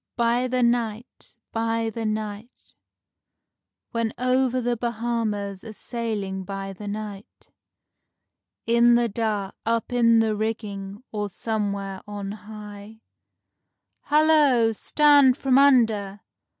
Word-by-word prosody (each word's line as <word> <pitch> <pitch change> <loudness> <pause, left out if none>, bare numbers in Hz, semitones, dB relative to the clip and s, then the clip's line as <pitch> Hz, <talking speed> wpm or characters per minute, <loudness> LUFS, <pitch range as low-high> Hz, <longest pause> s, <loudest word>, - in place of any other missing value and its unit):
_ - - -63
By 240 +1 +1
the 250 0 0
night, 235 -1 -2 0.2
by 225 0 -1
the 225 0 -3
night, 215 +2 -6 1.2
When 230 -1 -2
over 255 0 +1
the 240 0 0
Bahamas 225 -4 -3
a 220 -2 -9
sailing 210 -5 -4
by 195 0 -6
the 205 +2 -9
night. 205 -1 -8 1.1
In 235 +1 +5
the 240 0 +2
dark, 210 -3 -2
up 230 +1 -1
in 230 -1 +4
the 220 -1 +2
rigging, 210 -1 -4
or 210 -1 -3
somewhere 200 -2 -3
on 205 -1 -5
high, 210 0 -10 1.0
"Hallo! 295 -6 +4
Stand 285 +2 +4
from 270 -1 +3
under!" 220 -8 +3
225 Hz, 110 wpm, -24 LUFS, 205-240 Hz, 1.2 s, In